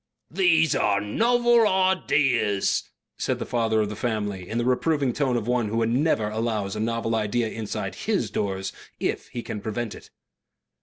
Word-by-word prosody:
"These 165 -3 +3
are 100 -1 +2
NOVEL 235 - +3
ideas," 145 - +2 0.3
said - - 0
the - - -4
father 115 -2 +1
of 105 - -1
the 105 - -5
family 105 -5 -3
in 115 - -2
the 120 - 0
reproving 135 +1 +1
tone 130 -3 +1
of 115 -1 -4
one 120 -2 +1
who 115 +2 0
never 120 -2 +1
allows 110 -2 -2
a - - -4
novel 115 +1 -1
idea 110 +1 0
inside 110 -1 -4
HIS - - -1
doors 95 -1 -2 0.3
if - - -2
he 120 - -6
can 105 - -5
prevent 110 +1 -3
it. - - -13
115 Hz, 165 wpm, -25 LUFS, 105-140 Hz, 0.3 s, These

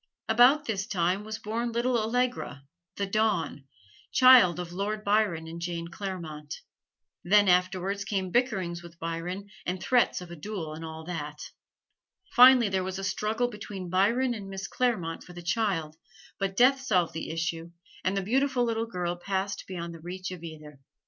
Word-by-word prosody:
About 250 +7 +5
this 205 -4 -2
time 185 -1 0
was 215 +1 -5
born 230 +3 -3
little 240 +2 0
Allegra, 235 - -1 0.3
"the 200 - -1
Dawn," 195 -9 0 0.5
child 250 -10 +7
of 175 -1 -5
Lord 210 +3 -2
Byron 200 -6 +1
and 165 +1 -8
Jane 170 -1 -4
Clairmont. 170 -6 -6 0.6
Then 205 +3 +5
afterwards 185 +2 +1
came 195 -2 -2
bickerings 190 -8 0
with 170 -1 -13
Byron 175 +5 -5
and 180 +1 -3
threats 245 +6 +2
of 180 -1 -10
a - - -6
duel 165 -2 -5
and 160 +1 -8
all 160 0 -7
that. 150 -3 -6 0.8
Finally 250 -2 +8
there 190 -1 0
was 190 0 -4
a 195 - -5
struggle 220 +4 0
between 200 -5 -7
Byron 235 +7 +2
and 200 -4 -7
Miss 195 0 -5
Clairmont 220 -11 -1
for 180 - -13
the 175 0 -9
child: 170 -5 -1 0.4
but 195 0 -2
death 265 +2 +5
solved 185 -10 +1
the 165 - -5
issue 165 +1 -3 0.3
and 190 +2 0
the 195 - 0
beautiful 260 +4 +1
little 230 -1 -1
girl 180 -4 -2
passed 195 +2 -3
beyond 170 -2 -5
the 165 - -10
reach 185 +2 -6
of 180 -3 -7
either. 155 -3 -10
190 Hz, 170 wpm, -28 LUFS, 170-220 Hz, 0.8 s, Finally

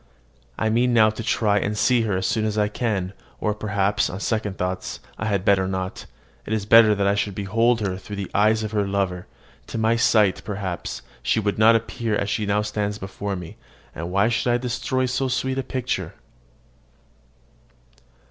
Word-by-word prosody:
I 110 - 0
mean 120 +2 +2
now 110 -1 +6
to 110 - -7
try 105 -2 +1
and 105 +2 -2
see 125 +2 +3
her 95 - +1
as 95 - -2
soon 110 +4 0
as 110 -1 -1
I 105 -1 +2
can: 105 -5 -2 0.3
or 105 - 0
perhaps, 105 -1 0
on 95 - -6
second 105 -2 -2
thoughts, 95 0 -3 0.2
I 110 - -2
had 100 -2 0
better 95 -2 +3
not; 95 0 -4 0.4
it 110 - -2
is 105 -2 -1
better 110 -1 +6
I 100 - +3
should 100 -1 -1
behold 115 +4 +1
her 95 -3 -2
through 100 +2 -8
the 100 -2 -5
eyes 110 +1 +3
of 110 - -4
her 105 -2 0
lover. 95 -3 -2 0.4
To - - -5
my 110 +1 +2
sight, 105 -4 +3
perhaps, 95 -4 -5 0.2
she - - +1
would 105 -1 -1
not 115 +1 +7
appear 115 0 -1
as 100 0 -1
she 105 -2 -1
now 105 +1 +1
stands 105 -1 -2
before 100 0 -5
me; 90 -3 -8 0.4
and 85 +2 -5
why 100 +3 +3
should 120 +1 +1
I 120 - +3
destroy 125 +1 -1
so 130 +1 -1
sweet 130 +1 -1
a - - +1
picture? 125 -10 -3
105 Hz, 190 wpm, -23 LUFS, 100-115 Hz, 0.4 s, not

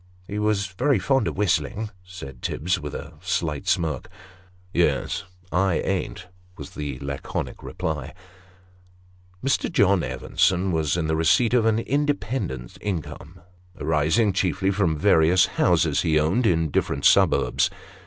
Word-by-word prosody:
" 90 - -30
He's 105 -1 0
very 120 +9 +1
fond 125 +4 +1
of - - -4
whistling," 100 +2 0
said 80 -9 -10
Tibbs, 90 +3 -1
with 75 -2 -6
a 75 - -7
slight 85 -2 -2
smirk. 80 -8 0 0.3
" 90 0 -30
Yes 75 -5 0 0.3
I 95 -1 +2
ain't," 90 +1 -2 0.3
was 70 - -9
the 70 -3 -5
laconic 70 -1 -5
reply. 80 -1 -4 1.3
Mr. 135 - +1
John 100 -2 +3
Evenson 95 +1 0
was 80 -1 0
in 85 - -1
the 80 0 0
receipt 85 +9 +3
of 115 -3 +4
an 110 -1 +3
independent 125 - -2
income, 90 -2 -5 0.4
arising 80 +7 +2
chiefly 95 +1 0
from 95 -6 +1
various 85 -1 +4 0.2
houses - - +3
he 80 -2 +2
owned 95 +11 +2
in 80 -3 +2
the 75 - -4
different - - -1
suburbs. - - +4
90 Hz, 140 wpm, -24 LUFS, 80-100 Hz, 1.3 s, of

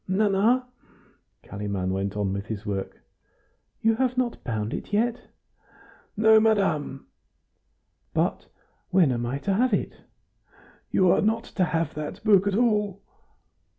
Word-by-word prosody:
"Nana?" 210 +6 +2 0.8
Kalimann 100 -3 -3
went 95 +1 -2
on 100 -2 -1
with 100 +1 -5
his 110 -1 -6
work. 100 -2 -5 0.8
"You 225 0 +3
have 255 0 0
not 250 -2 -1
bound 110 -2 -3
it - - -6
yet?" 235 +3 0 1.0
"No, 220 +1 +6
madame." 195 -11 +1 1.1
"But - - -1 0.4
when 180 -7 +4
am 120 -1 -2
I 130 +3 -2
to 195 +7 -1
have 235 +2 +2
it?" - - -3 1.0
"You 185 -2 +3
are - - +3
not 225 +2 +1
to 185 -5 -1
have 165 -1 -1
that 155 +6 -6
book 200 -3 +4
at 200 - +1
all." 210 -4 +1
195 Hz, 135 wpm, -25 LUFS, -, 1.1 s, No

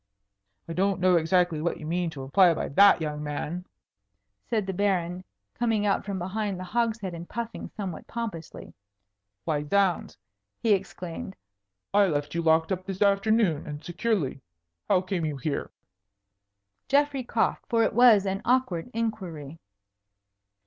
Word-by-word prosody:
"I 165 - -4
don't 195 +2 +1
know 185 0 +4
exactly 170 -1 +2
what 170 +1 -1
you 155 - -8
mean 175 +2 -1
to 140 -4 -8
imply 175 +7 +5
by - - -3
that, 200 +4 +6
young 150 -1 -3
man," 150 +4 -4 0.8
said 215 -4 0
the 190 - -3
Baron, 180 -2 0 0.3
coming 225 -3 0
out 200 - +1
from 200 -2 -3
behind 195 +2 -2
the - - -5
hogshead 220 -1 -1
and 170 +1 -8
puffing 235 0 -5
somewhat 190 -6 -6
pompously. 215 -9 -6 0.7
"Why, 150 -2 0
zounds!" 185 +3 +1 0.4
he 225 -3 +3
exclaimed, 185 -1 -4 0.6
"I 200 -1 +5
left 145 -3 -2
you 170 - 0
locked 160 +1 +3
up 185 -1 -1
this 195 +1 0
afternoon, 200 -4 +2
and 150 0 -7
securely. 175 - -1 0.5
How 185 -3 +4
came 185 -2 -3
you 150 -3 -2
here?" 140 +2 -3 1.2
Geoffrey 280 -1 +2
coughed, 235 -1 0
for 230 -1 +3
it - - +1
was 230 -5 +6
an 195 +1 -2
awkward 245 -8 +1
inquiry. 175 -10 -4
185 Hz, 150 wpm, -27 LUFS, 165-210 Hz, 1.2 s, that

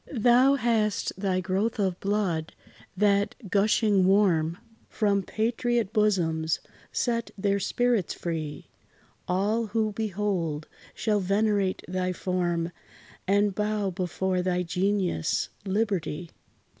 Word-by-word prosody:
Thou 250 +2 +5
hast 225 -5 0
thy 190 -1 0
growth 195 +5 -1
of 190 -3 0
blood, 195 -6 -1 0.4
that, 200 +1 +2 0.2
gushing 205 -1 +3
warm 175 -5 +3 0.3
From 200 -2 +1
patriot 230 +1 -1
bosoms, 165 -7 +1 0.3
set 235 -2 -1
their 200 0 +1
spirits 235 0 0
free: 160 -3 -5 0.6
All, 210 +5 +1
who 215 0 0
behold, 195 -7 -2 0.3
shall 215 -2 +1
venerate 200 0 +1
thy 185 0 -1
form, 175 -2 -1 0.6
And 205 +1 +3
bow 210 -1 -1
before 185 0 -1
thy 180 0 0
genius, 180 - 0 0.2
LIBERTY. 190 -5 -1
200 Hz, 105 wpm, -27 LUFS, 180-215 Hz, 0.6 s, Thou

